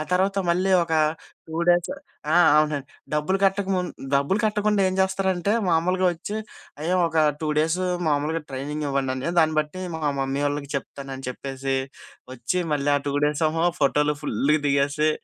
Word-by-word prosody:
తర్వాత 195 +2 +2
మళ్ళీ 185 +3 +1
ఒక 165 - -6 0.6
2 160 - -4
డేస్ 175 +4 +3 0.4
ఆ! - - +4 0.2
అవునండి 150 -3 +1 0.3
డబ్బులు 150 +6 +1
కట్టక 195 0 +1
ముందు 180 -1 -2 0.2
డబ్బులు 140 +8 +2
కట్టకుండా 210 -1 +1
ఏం 185 - -2
చేస్తారంటే 190 0 +1 0.2
మామూలుగా 180 +3 +2
వచ్చి, 200 +6 -6 0.4
"అయ్య 170 +4 -1
ఒక 165 0 -4 0.2
2 155 - -2
డేస్ 160 +3 +1 0.3
మామూలుగా 150 +2 0
ట్రైనింగ్ 145 +3 -4
ఇవ్వండి 135 -1 0
అన్నయ్య 130 +6 -3
దాన్ని 160 -1 +4
బట్టి 155 +5 -6
మా 160 - -4 0.2
మమ్మీ 135 +1 -1
వాళ్ళకి 145 -1 -3
చెప్తాను" 135 0 -7
అని 135 - -8
చెప్పేసి. 135 +1 -3 0.6
వచ్చి 130 +8 -2
మళ్ళీ 145 0 +1
ఆ - - +2
2 140 - -1
డేస్ 150 +2 0
ఏమో 165 +2 -1 0.2
ఫోటోలు 150 +1 +2
ఫుల్‌గా 150 +4 +1
దిగేసి 145 +2 +2
155 Hz, 160 wpm, -24 LUFS, 140-180 Hz, 0.6 s, ఆ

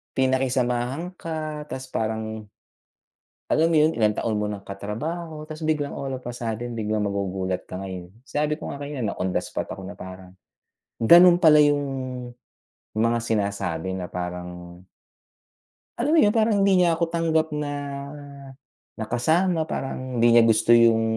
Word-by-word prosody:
pinakisamahan 130 +4 0
ka 155 -3 -5
ta's 130 0 -5
parang, 110 0 -3 1.0
alam 160 +1 +3
mo 165 - +3
yun, 155 +2 +4
ilang 110 -2 +3
taon 110 +1 -2
mo 105 0 -1
ng 100 -1 -7
katrabaho 150 - -5
ta's 155 0 -8
biglang 155 -2 -1
all 135 - -4
of 125 - -17
a 120 - -4
sudden, 120 0 -4
biglang 105 -2 -1
magugulat 95 -2 -2
ka 90 - -8
ngayon. 95 -2 -7 0.2
Sabi 150 +1 -1
ko - - -7
nga 140 - -7
kanina 145 0 -5
na 100 - -2
on 95 +1 -2
the - - +1
spot - - -5
ako 95 -1 -7
na - - -7
parang 95 0 -10 0.7
gano'n 175 +8 +8
pala 155 -2 +8
yung 145 -1 +4 1.1
mga 115 +2 +2
sinasabi 100 -5 -2
na 90 - -4
parang 90 0 -6 1.2
Alam 270 +6 +1
mo - - +6
yun, 205 - +4
parang 220 -1 +3
hindi 195 -2 +4
niya 170 -2 +4
ako 170 - -1
tanggap 160 -1 +1
na 150 -1 -2 1.3
na 110 - -4
kasama 160 +7 +2
parang 130 -3 -4
hindi 120 0 +5
niya 120 - +8
gusto 110 +1 +3
yung 115 -1 +5
120 Hz, 160 wpm, -24 LUFS, 100-155 Hz, 1.3 s, gano'n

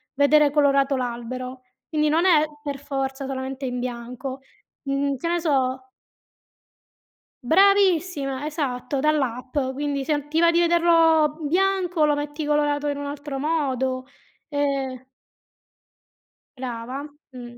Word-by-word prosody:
vedere 285 +1 +4
colorato 280 -1 +3
l'albero. 255 +1 -5 0.3
Quindi, 305 -1 +1
non 325 +4 +2
è 325 -5 +5 0.2
per 285 -2 -5
forza 270 -1 -3
solamente 265 0 -4
in 250 -1 -3
bianco, 250 +2 -5 0.4
mhmm, 275 0 0
che 335 - -4
ne 345 0 +1
so 260 -4 0 1.5
Bravissima. 350 -5 +3
Esatto, 280 -3 -2
dall'app. 265 -4 -1 0.2
Quindi, 285 0 -2
se 305 +3 0
non 290 0 -3
ti 315 +2 +1
va 335 0 +5
di 340 - +2
vederlo 330 -3 +4
bianco 360 +1 +1
lo 295 - +2
metti 295 +1 -4
colorato 295 0 +1
in 285 -1 -1
un 285 - -5
altro 285 -1 -5
modo, 265 -4 -1 0.4
ehm 275 -3 -2 1.5
Brava. 250 +2 -5 0.3
Mh. 240 -1 -10
285 Hz, 125 wpm, -24 LUFS, 260-305 Hz, 1.5 s, è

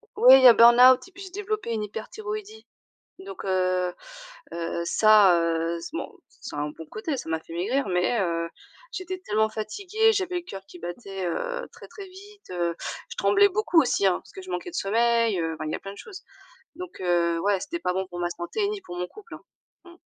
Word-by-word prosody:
Oui 255 +2 +8
il - - +1
y - - +11
a 240 - +10
burn-out 250 +4 +7
et - - -18
puis 390 +1 -11
j'ai 380 - -9
développé 415 - -4
une 215 - -2
hyperthyroïdie, 425 - -7 0.6
donc 385 -1 -9
heu 185 -1 0 0.6
heu, 170 0 -3
ça, 210 -1 +5
heu, 165 0 -1
c'est, 295 - -7
bon, - - -5 0.2
ça 360 - -10
a - - -1
un 150 0 -2
bon 160 +1 -11
côté, 275 +7 -3
ça 205 - -7
m'a 160 0 -1
fait 165 - -14
maigrir, 215 +8 -1
mais 180 +5 +1
heu, 170 -2 -1 0.4
j'étais 370 0 -5
tellement 220 - 0
fatiguée, 395 - 0
j'avais 375 -3 -2
le 350 - -2
cœur 195 - -9
qui 180 - -13
battait, 190 +1 -6
heu, - - -3
très, - - -13
très 400 -2 -10
vite, 405 +2 -15
heu, 175 -2 -1 0.3
je - - -9
tremblais 405 0 +4
beaucoup 380 -4 +2
aussi 245 -8 +1
hein, 185 - +4
parce - - -19
que 380 -1 -9
je 370 - -10
manquais 360 - -4
de - - -18
sommeil, 230 -1 +2
heu, 165 0 -2
enfin 155 - -6
il 155 - -3
y - - -2
a - - -2
plein 195 - -8
de 200 - -14
choses, 390 -4 -10 0.5
donc 360 0 -9
heu, 170 -2 +1
ouais, 200 +1 +1
c'était 335 - -5
pas 180 - -1
bon 190 0 -2
pour 175 -1 -8
ma 175 - -1
santé 175 - -3
ni 415 -1 -4
pour 175 - -9
mon 180 - -2
couple, 425 +2 -13
hein. - - -12 0.4
Mmh. 345 - -15
225 Hz, 225 wpm, -25 LUFS, -, 0.6 s, y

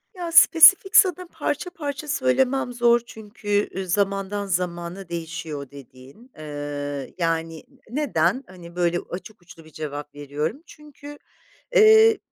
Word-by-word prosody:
Ya, 345 -2 -5
spesifik 335 +4 +7
sana 365 -1 +5
parça 315 +2 -3
parça 295 -4 -6
söylemem 260 -3 0
zor 240 0 +3
çünkü, 205 -2 -3
ııı, 190 0 -4
zamandan 200 +1 -1
zamana 175 0 -4
değişiyor 165 -3 -6
o 140 -2 -10
dediğin, 140 - -15
ııı, 145 -2 -6
yani 165 -2 -2 0.3
ı 240 - -9
neden 255 - 0
hani 175 -2 -13
böyle 175 -1 0
açık 190 +3 -9
uçlu 165 -2 -16
bir 160 - -17
cevap 145 -1 -7
veriyorum 150 - -5
çünkü, 290 -1 -13 0.6
eee, 440 0 +7
195 Hz, 130 wpm, -23 LUFS, -, 0.6 s, spesifik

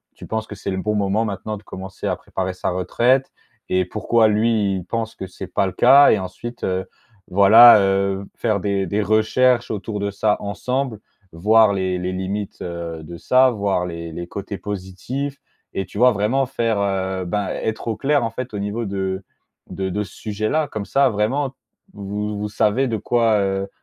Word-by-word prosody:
tu - - -11
penses 110 0 -3
que 105 - -8
c'est 100 - -5
le 95 - -2
bon 105 0 -1
moment 100 +2 +1
maintenant 105 0 -4
de - - -13
commencer 95 -1 -7
à - - 0
préparer 95 -1 -4
sa 90 - -2
retraite 120 +9 +1 0.4
et 95 -1 +2
pourquoi, 110 +3 +2
lui, 105 -2 +2
il 95 - -4
pense 115 -1 -3
que 95 - -6
c'est 95 +1 -8
pas 95 +2 0
le 95 - -3
cas 140 +3 +7
et - - +4
ensuite, 100 +6 -7
heu, 95 0 -1 0.4
voilà, 110 +4 +8
heu, 95 0 +1
faire 110 -4 0
des 100 -1 -1
des 105 +4 0
recherches 120 +4 +2
autour 105 0 -4
de 100 0 -1
ça 105 +1 +1
ensemble. 115 +4 -3 0.3
Voir 105 +5 +4
les 95 -1 -1
les 90 +1 -2
limites, 95 +2 -4
heu, 85 -2 -6
de 85 +2 -9
ça, 130 +6 +4
voir 100 -5 -1
les 85 -1 -6
les 85 +2 -6
côtés 100 +2 -6
positifs 105 +9 -5 0.4
et 95 - -2
tu 105 - -8
vois, 125 0 +6
vraiment 115 +6 +1
faire, 115 -5 -1
heu, 95 -1 -1
ben, 100 +3 -2
être 110 +1 -3
au 110 - 0
clair, 140 0 +2
en 115 - -2
fait, 125 -1 -6
au 100 - -3
niveau 105 +3 -3
de 95 -1 -3 0.5
de 95 0 -3
de 105 +3 -2
ce 95 - -12
sujet-là, 110 +9 -1
comme 105 -5 -5
ça, 140 -1 +3
vraiment, 125 +6 -1 0.4
vous 105 +1 -4
vous 105 0 -3
savez 110 +6 +1
de 110 - -1
quoi, 115 0 +2
heu, 95 0 -1
105 Hz, 195 wpm, -21 LUFS, 95-115 Hz, 0.5 s, voilà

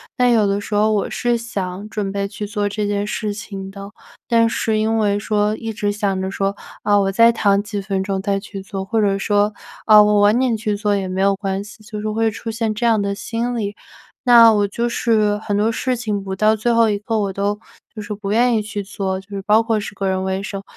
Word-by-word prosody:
但 250 -1 +3
有 220 -3 +4
的 200 +1 0
时 210 - -7
候 215 +1 +3
我 205 - 0
是 240 -1 0
想 205 -4 -5
准 210 -2 -3
备 200 0 -2
去 210 +1 -6
做 205 -1 -1
这 210 +1 -2
件 205 0 -1
事 210 0 -3
情 195 -2 -7
的， 200 +1 -9 0.4
但 230 -1 +4
是 220 -1 0
因 220 +1 +1
为 205 -2 +2
说 210 0 0
一 225 -1 -5
直 205 -2 -1
想 200 -2 -1
着 190 - -2
说， 195 0 -1 0.3
啊， 205 -1 +3
我 195 0 0
再 230 +4 +5
躺 200 -3 +2
几 205 -1 -4
分 195 -1 -2
钟 195 -1 -2
再 200 0 0
去 195 -1 -8
做， 195 -1 -5
或 225 +2 0
者 200 -1 +2
说， 205 +1 +1 0.3
啊， 215 -1 +8
我 210 0 +4
晚 205 +3 +4
点 255 -3 +1
去 215 -1 -2
做 205 0 +1
也 195 -1 -2
没 185 +1 -3
有 195 0 +3
关 195 0 -3
系， 215 +1 -14
就 210 0 -7
是 215 +1 -3
会 225 +1 +1
出 225 +1 -7
现 225 -1 -1
这 215 +3 -2
样 225 -3 +3
的 200 0 -1
心 235 +3 -3
理。 205 -2 -3 0.5
那 235 -2 +8
我 205 -1 +2
就 235 +4 -1
是 220 -3 +1
很 205 -1 -2
多 210 +2 +2
事 250 +2 -1
情 210 -4 -3
不 190 -1 -5
到 215 +3 +3
最 220 +3 0
后 230 -1 +4
一 205 - 0
刻 220 +2 -2
我 200 -2 -1
都 205 +2 -1 0.3
就 215 - -7
是 210 - -5
不 200 -1 -5
愿 240 +2 +3
意 220 - +1
去 210 -1 -5
做， 190 -1 -3
就 195 - -16
是 195 - -4
包 210 +3 +4
括 225 -1 0
是 205 - -7
个 195 0 -2
人 190 0 0
卫 190 0 -2
生。 195 -1 -6
210 Hz, 270 characters per minute, -20 LUFS, 200-225 Hz, 0.5 s, 啊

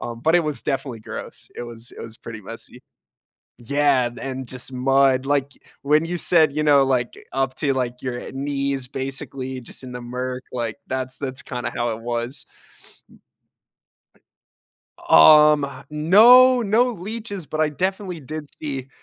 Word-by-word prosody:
Um, 115 -1 -6
but 160 +6 +2
it 170 - +2
was 150 -2 -3
definitely 135 -4 -3
gross. - - -8
It - - -5
was 120 0 -8
it - - -11
was 115 0 -8
pretty 110 -2 -9
messy. 115 +4 -9 0.8
Yeah, 140 0 +2
and 120 +1 -7
and 130 -1 -5
just 130 +1 -6
mud, 135 +1 +3
like, 140 -1 0 0.3
when 150 +3 +3
you 175 +1 -3
said, 160 -3 +4
you 150 +1 -1
know, 140 -2 +5
like, 125 -3 0 0.2
up 135 -1 -1
to, 140 -3 0
like, 125 -1 -3
your, 125 -2 -4
uh, - - -8
knees, 140 -1 -2
basically, 130 -1 -5
just 125 - -9
in 125 - -8
the 125 - -6
murk, 125 +1 -4
like, 115 -3 -3
that's 130 -1 -4
that's 130 -2 -5
kinda 125 -2 -4
how 120 0 0
it 110 - -7
was. 120 +3 -4 2.6
Um, 150 - +7 0.2
no, 240 +11 +7
no 230 +4 +2
leeches, 205 -3 -6
but 155 +3 -4
I 155 - +3
definitely 185 +2 -3
did 150 +1 -7
see 135 -3 -6
135 Hz, 160 wpm, -22 LUFS, 125-150 Hz, 2.6 s, Um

